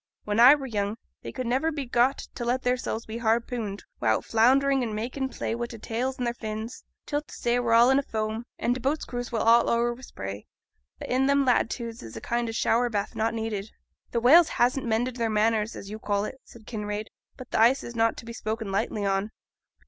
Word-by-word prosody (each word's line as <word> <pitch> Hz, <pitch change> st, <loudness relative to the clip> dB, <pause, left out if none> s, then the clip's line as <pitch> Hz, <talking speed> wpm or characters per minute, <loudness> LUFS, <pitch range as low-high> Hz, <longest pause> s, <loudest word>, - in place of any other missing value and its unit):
When 210 Hz, +1 st, -1 dB
I 255 Hz, +5 st, +9 dB
were 280 Hz, -2 st, -6 dB
young, 210 Hz, -3 st, -2 dB, 0.2 s
they -, -, -7 dB
could 255 Hz, -, -4 dB
niver 265 Hz, +7 st, +1 dB
be 290 Hz, -3 st, -4 dB
got 245 Hz, +2 st, +2 dB, 0.2 s
to 245 Hz, -, -5 dB
let 245 Hz, +2 st, 0 dB
theirsels 245 Hz, -2 st, -1 dB
be 225 Hz, +1 st, -6 dB
harpooned 225 Hz, -2 st, -1 dB, 0.2 s
wi'out -, -, +1 dB
flounderin' 265 Hz, +4 st, +3 dB
and 225 Hz, -3 st, -2 dB
makin' 255 Hz, +5 st, -3 dB
play -, -, -3 dB
wi' 235 Hz, +1 st, -3 dB
their 235 Hz, -, -9 dB
tales 245 Hz, +4 st, -3 dB
and 250 Hz, -, -2 dB
their 235 Hz, -, 0 dB
fins, 220 Hz, 0 st, -6 dB, 0.2 s
till 290 Hz, 0 st, -1 dB
t' 300 Hz, -, -19 dB
say 240 Hz, +1 st, 0 dB
were 235 Hz, -2 st, +2 dB
all 240 Hz, +3 st, +6 dB
in 265 Hz, -, +4 dB
a -, -, +1 dB
foam, 220 Hz, -1 st, -3 dB
and 245 Hz, -, +1 dB
t' 255 Hz, -, -4 dB
boats' 275 Hz, +5 st, -1 dB
crews 245 Hz, 0 st, -5 dB
was 230 Hz, -, 0 dB
all 230 Hz, +1 st, +5 dB
o'er 235 Hz, +1 st, +2 dB
wi' 245 Hz, -, -13 dB
spray, 100 Hz, -, -7 dB, 0.5 s
which -, -, -7 dB
i' 260 Hz, +1 st, +3 dB
them 280 Hz, 0 st, +3 dB
latitudes 235 Hz, -2 st, 0 dB
is 110 Hz, -, -9 dB
a -, -, -4 dB
kind 235 Hz, 0 st, -1 dB
o' -, -, -2 dB
shower 235 Hz, +2 st, +2 dB
bath 205 Hz, -3 st, -3 dB
not 225 Hz, +1 st, 0 dB
needed.' 220 Hz, -2 st, -3 dB, 0.4 s
'Th' 235 Hz, -1 st, -1 dB
whales 320 Hz, +6 st, +7 dB
hasn't 250 Hz, +1 st, +1 dB
mended 240 Hz, +3 st, 0 dB
their 230 Hz, -1 st, 0 dB
manners, 215 Hz, 0 st, +1 dB
as 200 Hz, -, -8 dB
you 215 Hz, -, -6 dB
call 205 Hz, -1 st, -1 dB
it,' 265 Hz, -, -8 dB
said 225 Hz, -2 st, -16 dB
Kinraid; 210 Hz, -1 st, -4 dB, 0.3 s
'but 255 Hz, -, -11 dB
th' -, -, 0 dB
ice 240 Hz, +5 st, +5 dB
is 235 Hz, -, -8 dB
not 225 Hz, 0 st, +2 dB
to -, -, -9 dB
be 235 Hz, -, -7 dB
spoken 220 Hz, -2 st, -4 dB
lightly 205 Hz, +1 st, -1 dB
on. 195 Hz, +1 st, 0 dB
235 Hz, 230 wpm, -26 LUFS, 220-250 Hz, 0.5 s, I